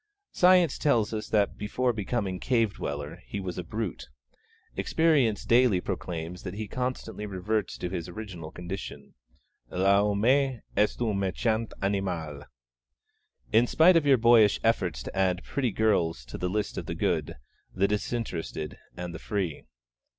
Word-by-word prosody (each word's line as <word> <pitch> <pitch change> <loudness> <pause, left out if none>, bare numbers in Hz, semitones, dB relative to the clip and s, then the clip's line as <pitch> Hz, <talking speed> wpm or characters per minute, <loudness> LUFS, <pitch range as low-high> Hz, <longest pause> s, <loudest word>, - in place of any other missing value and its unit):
Science 180 -4 +4
tells 115 -7 +2
us 110 -1 -4
that 105 -2 +1
before 120 +4 0
becoming 100 -3 -2
cave 115 -1 +1
dweller 75 +3 -5
he 100 - -4
was 90 -2 -4
a - - -3
brute; 105 - -5 0.7
Experience 145 -10 +2
daily 120 -5 +4
proclaims 85 0 -5
that - - -6
he 110 0 -4
constantly 125 -3 -4
reverts 100 +2 -2
to - - -3
his 90 -1 -4
original 90 -5 -7
condition. 85 -5 -7 0.6
L'homme 100 +3 +2
est 135 -1 +2 0.4
un 110 -3 +1
méchant 110 +4 0
animal, 90 -7 -2 1.1
in 115 +2 +5
spite 170 +7 +6
of 160 -3 +3
your 135 -2 +6
boyish 115 -3 +5
efforts 110 - +1
to - - -8
add 95 -1 +1
pretty 135 -3 -1
girls 90 - +1
'to - - -8
the 90 - -1
list 105 +2 -2
of - - -8
the - - -3
good, - - -1 0.4
the 95 +1 +1
disinterested, 100 -7 -3 0.2
and 90 -1 -5
the 85 - -7
free.' 95 -8 -3
105 Hz, 145 wpm, -28 LUFS, 90-115 Hz, 1.1 s, spite